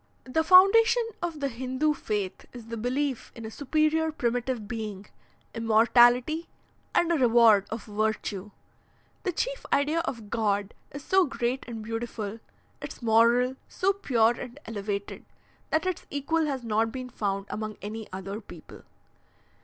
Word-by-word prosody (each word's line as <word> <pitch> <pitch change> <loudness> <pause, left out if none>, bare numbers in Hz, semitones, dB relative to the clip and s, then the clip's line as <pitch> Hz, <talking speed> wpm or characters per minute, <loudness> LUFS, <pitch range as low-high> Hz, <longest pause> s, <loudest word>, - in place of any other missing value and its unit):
"The 290 +5 0
foundation 395 +7 +6 0.2
of 335 -4 -4
the 280 - +1
Hindoo 260 +4 -1
faith 210 -8 -4
is 235 -2 -10
the 230 - -4
belief 255 +3 -2
in 230 - -8
a 220 - -6
superior 310 +4 +1
primitive 245 -5 -2
being, 215 -3 -5 0.5
immortality, 240 +7 +4 0.5
and 340 -1 +3
a 335 - +3
reward 230 -5 +5
of 220 -1 -5
virtue. 210 -2 -2 0.7
The 365 - -1
chief - - -3
idea 295 +4 +2
of 235 -10 -5
God 205 -3 0 0.2
is 285 0 -9
so 380 -1 +4
great 250 0 -2
and 225 -2 -6
beautiful, 225 -1 -5 0.4
its - - -8
moral 235 +3 +4
so 390 +2 +1
pure 240 - +2
and 245 +3 -8
elevated, 205 -2 -4 0.5
that 315 +2 +1
its 370 -2 -3
equal 305 +3 0
has 270 -4 -3
not 225 0 +1
been 255 0 -6
found 195 -2 -2
among 215 0 -4
any 215 +1 -6
other 195 +3 -6
people. - - -13
240 Hz, 145 wpm, -27 LUFS, 220-290 Hz, 0.7 s, foundation